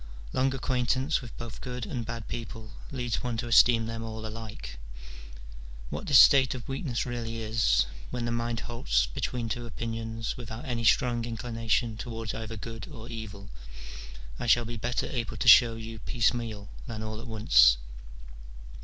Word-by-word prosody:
Long 130 +1 +2
acquaintance 130 +3 0
with 120 -4 -10
both 120 -1 -8
good 125 -3 -5
and 120 +2 -4
bad 115 -1 -6
people 115 -2 -6 0.2
leads 125 -4 -2
one 120 -2 -2
to 120 +1 -3
esteem 115 -1 +6
them 115 0 -4
all 110 -1 -6
alike. 110 - -7 1.1
What 75 - -5
this 140 - +7
state 130 -3 +7
of 125 - -8
weakness 135 -2 -2
really 115 -2 -4
is, 110 - +3 0.2
when 120 -1 -3
the 120 - -1
mind 115 0 -1
halts - - +1
between 115 - -3
two 120 +1 -3
opinions 115 0 -4
without 120 +2 -7
any 120 -3 -2
strong 120 +1 +3
inclination 115 -1 -1
towards 115 -2 -5
either 115 0 -6
good 115 0 -7
or 115 -4 -9
evil, 105 -3 -7 0.9
I - - -3
shall 120 +1 +5
be 120 +1 -5
better 120 +2 -1
able 120 -4 -3
to - - -2
show 115 -3 +9
you 115 0 -7
piecemeal 115 -4 -1 0.2
than 110 -2 -5
all 110 0 -5
at - - -9
once. 105 - +6
115 Hz, 160 wpm, -28 LUFS, 110-120 Hz, 1.1 s, show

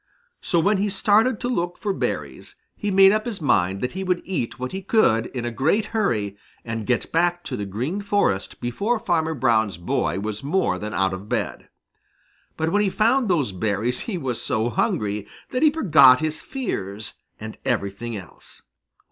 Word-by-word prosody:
So 170 - +1
when 200 +5 +3
he 205 +2 0
started 210 +4 +3
to 245 - -1
look 175 -8 -1
for 205 -2 -2
berries, - - -4 0.2
he 210 - -3
made 195 0 +7
up 215 +2 0
his 220 -5 -4
mind 95 - +1
that 125 - -1
he 190 +1 -4
would 180 -1 0
eat 160 -12 -3
what 130 0 -4
he 190 - -4
could 150 - +3
in 125 -2 -5
a 120 - -2
great 160 - +1
hurry 110 - 0 0.3
and 115 -2 -4
get 125 -3 0
back 175 +1 +1
to - - -4
the 100 -1 -4
Green 130 - -3
Forest 200 - 0
before 200 - -1
Farmer 160 -7 0
Brown's 110 - +2
boy 85 +2 -1
was 105 +1 -4
more 140 - 0
than 105 +2 -5
out 95 -1 +1
of 95 +3 -7
bed. - - -3 0.9
But 160 +1 0
when 205 - +3
he 205 - +2
found 230 +6 +2
those 150 - +1
berries 105 +6 -1
he 195 - -2
was 130 -7 -2
so 110 +2 0
hungry 105 -1 -1 0.2
that 255 - -1
he 310 - +7
forgot 160 - +6
his 155 0 -2
fears 105 - -4 0.3
and 110 0 -8
everything 110 -1 -2
else. 90 -6 -13
145 Hz, 185 wpm, -23 LUFS, -, 0.9 s, made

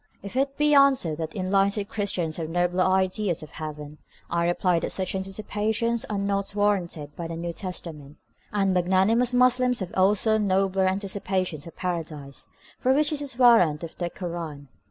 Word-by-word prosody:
If 200 +4 -8
it 275 +1 0
be 295 0 +3
answered 265 - +4
that 160 -1 -5
enlightened 200 +2 +1
Christians 185 -7 -2
have 160 -2 -4
nobler 175 +2 +1
ideas 185 -1 +1
of 155 - -11
heaven, 150 -1 -8 0.3
I 170 0 +1
reply 175 0 +1
that - - -3
such 190 -1 -1
anticipations 215 +4 -1
are 210 - -3
not 200 0 -1
warranted 175 -8 -1
by 170 - -5
the 165 - -5
New 170 0 -4
Testament, 160 -6 -6 0.3
and 195 -2 +1
that 180 -1 +2
magnanimous 215 +7 +3
Muslims 250 0 +3
have 185 -3 -5
also 210 +3 +3
nobler 195 -1 +1
anticipations 190 -4 -2
of 170 - -11
paradise, 155 -6 -4 0.3
for 260 - +3
which 295 +2 +2
there 295 -1 -2
is 275 -4 -3
warrant 205 -12 +5
in 165 - -6
the 175 -1 -1
Kur 175 0 -6
ân. 150 -5 -7
190 Hz, 175 wpm, -25 LUFS, 170-210 Hz, 0.3 s, warrant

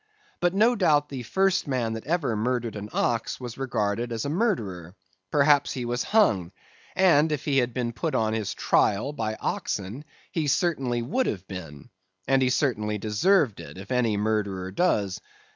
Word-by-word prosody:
But 175 +1 +1
no 225 +4 +4
doubt 150 -7 +3
the 135 -3 -5
first 190 +8 +1
man 125 -5 -1
that 110 +3 -7
ever 155 -8 0
murdered 120 +1 -1
an 105 0 -6
ox 115 -2 -1
was 125 0 -7
regarded 120 -2 -1
as 115 +1 -3
a - - -1
murderer; 105 - -1 0.3
perhaps 145 +2 +3
he 125 -2 -4
was 120 +1 -1
hung; 105 - +2 0.4
and 160 -5 +4
if 150 - -2
he 140 -2 +3
had 125 -1 0
been 120 -1 -2
put 155 +4 -2
on 110 -2 +1
his 110 -3 -2
trial 110 +8 +1
by 110 -5 -2
oxen, 105 +5 -3 0.3
he 160 -3 -1
certainly 135 -7 0
would 255 - 0
have 95 -2 -4
been; 90 +2 -9 0.4
and 135 0 +3
he 130 - +3
certainly 110 -6 0
deserved 110 - +2
it - - -10
if 95 +4 -10
any 120 -4 +1
murderer 100 -3 -1
does. 100 - 0
120 Hz, 175 wpm, -26 LUFS, 105-150 Hz, 0.4 s, no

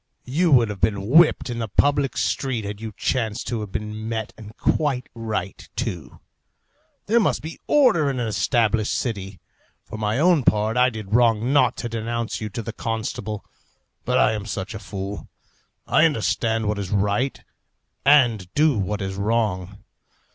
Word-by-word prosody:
You 165 +6 +1
would 120 -4 +5
have 100 -3 -6
been 100 -1 0
whipped 160 +4 +5
in 120 - -4
the 115 - -2
public 140 +5 +1
street 125 -6 -1
had 100 +1 -6
you 110 -1 -5
chanced 115 -4 -1
to 115 -1 -2
have 105 -2 -6
been 105 +1 -5
met, 110 -2 -3
and 110 0 -12
quite 135 -5 0
right, 105 -5 -5
too. 90 - -5 0.9
There 230 +3 +3
must 210 - +1
be 160 +1 -7
order 175 - +4
in 130 -2 -2
an 120 - -1
established 110 0 +1
city. 100 -5 -4 0.5
For 110 - -8
my 105 +1 0
own 165 -1 +4
part, 110 0 +2
I 125 +1 +4
did 110 -4 -7
wrong 120 +1 +3
not 145 - +3
to 120 - -3
denounce 115 0 -3
you 105 - -3
to 115 +3 -5
the 115 - -6
constable. 110 -2 -4 0.6
But - - +1
I - - +4
am 105 -1 -4
such 100 +1 -4
a 110 - -6
fool! 100 0 -6 0.6
I 155 - +4
understand 115 -5 0
what 105 -1 -1
is 100 -3 -4
right 105 +6 0 0.6
and 120 -10 +4
do 150 -6 +3
what 100 +1 -2
is 95 0 -4
wrong. 100 -3 -1
110 Hz, 170 wpm, -23 LUFS, 105-125 Hz, 0.9 s, would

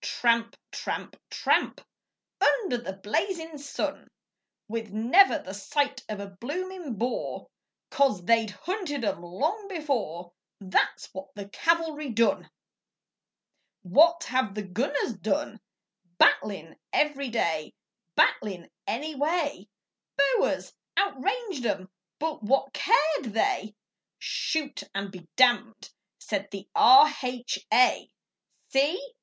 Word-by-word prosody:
Tramp, 230 -1 +1
tramp, - - -5
tramp - - +1 0.6
Under 385 - +2
the 195 -5 -6
blazin' 320 - -3
sun, 280 0 -4 0.6
With 225 0 -4
never 255 - +5
the 190 -10 -8
sight 270 +6 -1
of 210 -1 -4
a 200 - -5
bloomin' 295 - -5
Boer, 240 +5 -3 0.5
'Cause 260 -11 +2
they'd 225 0 +3
hunted 305 - -4
'em 185 - -1
long 310 - -2
before 235 - -3 0.3
That's 190 -2 0
what 190 0 -7
the 200 -1 -8
cavalry 320 +1 0
done! 230 0 +1 1.3
What 330 - +5
have 255 -5 -1
the 210 - -3
gunners 240 +7 -1
done 290 - -1 0.6
Battlin' 175 -6 +2
every 280 -3 +1
day, 165 -9 -1 0.4
Battlin' 185 -5 +1 0.2
any 300 +7 -2
way. 290 - -1 0.5
Boers 280 -1 +1 0.2
outranged 400 - -1
'em, 190 -2 -3 0.3
but 315 -2 -3
what 270 +5 +1
cared 310 - +2
they? 225 - 0 0.4
'Shoot 300 -3 -2
and 200 0 -3
be 180 -3 -12
damned,' 240 -3 +3 0.3
said 205 -1 -3
the 195 0 -8
R.H.A.! 255 -2 +4 0.6
See! 350 - 0
255 Hz, 105 wpm, -27 LUFS, 205-305 Hz, 1.3 s, never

